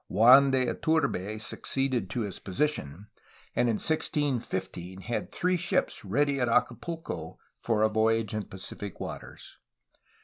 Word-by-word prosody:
Juan 125 +7 +7
de 130 -1 +2
Iturbe 115 - 0
succeeded 125 -2 -1
to 120 - -2
his 100 -4 -4
position, 95 - -2 0.5
and 120 - +3
in 115 - +2
1615 105 - -1
had 115 +5 -3
three 180 0 +1
ships 175 +1 0
ready 140 +7 +1
at 125 -2 +1
Acapulco 125 +8 -2 0.2
for 110 -2 +1
a - - +6
voyage 110 0 +1
in 105 -2 -2
Pacific 95 +1 -8
waters. - - -8
115 Hz, 130 wpm, -28 LUFS, 100-140 Hz, 0.5 s, Juan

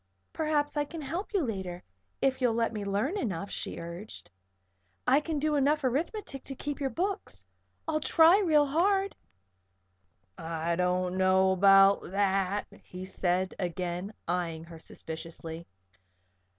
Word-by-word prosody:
"Perhaps 300 -2 0
I 295 - +3
can 325 +2 -7
help 335 +8 -4
you 395 -6 +1
later, 190 -7 -4 0.4
if 265 -1 +2
you'll 240 -3 +3
let 230 0 +1
me 210 -2 -3
learn 210 - -1
enough," 200 -4 -3
she - - -3
urged. 170 - -8 0.7
"I 265 +3 +5
can 305 0 -3
learn 300 0 +1
enough 295 +2 +2
arithmetic 275 - -2
to 270 - -6
keep 290 +2 -4
your 270 - +1
books. 380 - -3 0.4
I'll 315 -1 +1
try 330 +5 +6
real 310 -7 +4
hard." 385 +7 +1 1.2
"I 165 +1 -2
don't 180 +1 0
know 190 0 +4
about 195 +1 +6
that," 195 0 +1 0.2
he 185 +1 -8
said, 185 0 0
again, 180 +2 -3 0.2
eyeing 165 -2 -1
her 165 -1 -11
suspiciously. 165 +1 -7
205 Hz, 135 wpm, -29 LUFS, 180-295 Hz, 1.2 s, try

